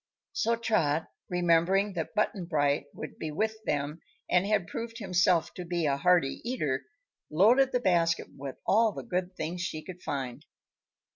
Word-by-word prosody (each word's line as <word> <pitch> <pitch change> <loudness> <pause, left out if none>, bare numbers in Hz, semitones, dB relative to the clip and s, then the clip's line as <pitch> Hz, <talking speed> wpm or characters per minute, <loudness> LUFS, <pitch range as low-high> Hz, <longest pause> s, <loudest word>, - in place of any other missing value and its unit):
So 230 - +1
Trot, 165 -10 +1 0.2
remembering 180 +3 +3
that 165 +1 -4
Button 210 -3 0
Bright 145 -4 +1
would - - -8
be 160 - -3
with 220 +8 -1
them 145 +2 -1 0.3
and 180 +2 +3
had 205 -4 +2
proved 230 +4 -6
himself 180 -5 +2
to 180 - -6
be 170 -1 -1
a 140 -2 +2
hearty 170 -2 +2
eater, 150 - -1 0.4
loaded 235 - +5
the 250 - +1
basket 170 -5 +2
with 135 -1 -6
all 220 +1 +4
the - - -6
good 185 -3 -2
things 170 +2 -4
she 155 -3 -4
could 180 -1 -9
find. 135 -4 -4
175 Hz, 160 wpm, -29 LUFS, 155-210 Hz, 0.4 s, loaded